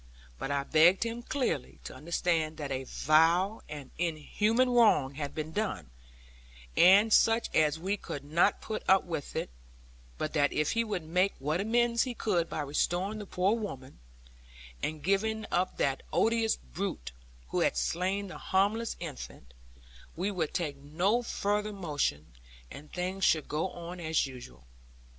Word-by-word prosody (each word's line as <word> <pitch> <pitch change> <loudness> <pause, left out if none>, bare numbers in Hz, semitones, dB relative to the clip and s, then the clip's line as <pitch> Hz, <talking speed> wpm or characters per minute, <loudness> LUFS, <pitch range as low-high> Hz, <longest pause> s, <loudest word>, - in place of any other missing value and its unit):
But - - -4
I 140 -1 0
begged 165 +7 +5
him 230 +1 -4
clearly 245 - -2
to - - -8
understand 160 +1 -1
that 145 -3 -5
a 130 0 -3
vile 165 - +3
and 145 -3 -8
inhuman 210 - +1
wrong 210 - +4
had 145 0 -5
been 155 0 -4
done, 205 - -3 0.8
and 200 +5 +6
such 225 +1 +3
as 155 -1 +3
we 190 +5 -2
could 140 -7 -7
not 165 +7 +2
put 215 - -4
up 190 0 +6
with; 165 -5 -5 0.8
but 155 - -3
that 145 -2 +2
if 150 0 0
he 230 - +1
would 205 -6 -3
make 180 +5 +1
what 150 +6 -1
amends 235 +2 +2
he 250 -2 -1
could 175 -7 0
by - - -3
restoring 175 +8 -1
the 205 - -7
poor 190 +5 +1
woman, 135 - -7 0.8
and 155 -1 -3
giving 215 +4 0
up 180 +1 0
that 135 -1 0
odious 225 -1 +2
brute 60 0 -5 0.4
who - - -1
had - - +1
slain 185 - -1
the 185 - -9
harmless 205 +4 0
infant, 135 - -8 0.6
we 190 +5 -1
would 165 -6 -2
take 150 -5 -2
no 175 +12 0
further 210 -2 -1
motion; 145 - -2 0.4
and 150 +2 -11
things 185 +2 -3
should 155 -4 +3
go 155 +5 -1
on 175 +1 -8
as 160 -2 +1
usual. 120 - -11
175 Hz, 155 wpm, -30 LUFS, 150-205 Hz, 0.8 s, and